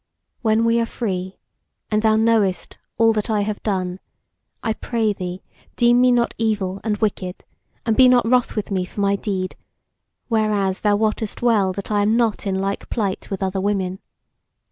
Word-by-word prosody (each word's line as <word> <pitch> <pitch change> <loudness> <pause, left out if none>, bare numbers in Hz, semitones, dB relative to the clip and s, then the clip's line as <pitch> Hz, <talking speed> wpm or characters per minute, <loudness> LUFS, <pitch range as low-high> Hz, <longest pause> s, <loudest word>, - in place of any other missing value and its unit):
When 225 -1 +2
we 230 0 +3
are 230 - 0
free, 190 -6 -4 0.5
and 215 0 +2
thou 220 0 +4
knowest 220 -4 +1 0.2
all 225 0 +4
that 210 0 -2
I 215 -2 +1
have 205 0 -3
done, 185 -3 -2 0.6
I 225 -2 0
pray 220 -1 -1
thee 180 -1 -6 0.3
deem 240 0 +4
me 250 0 +5
not 240 -1 +2
evil 200 -4 -1
and 215 -2 -1
wicked, 190 -4 -3 0.4
and 225 -2 +2
be 255 +1 +7
not 245 -2 +4
wroth 250 0 +2
with 210 -2 -3
me 185 -2 0
for 185 - -9
my 200 0 +2
deed; 190 -2 -3 0.7
whereas 210 -4 +1
thou 205 -1 +2
wottest 215 +1 -1
well 210 -6 +3
that 200 +2 -6
I 205 -1 +2
am 215 +3 +2
not 225 -3 0
in 190 - 0
like 195 +1 -3
plight 200 -4 -2
with 195 -1 -3
other 190 0 -1
women. 190 -2 -1
210 Hz, 180 wpm, -21 LUFS, 195-225 Hz, 0.7 s, be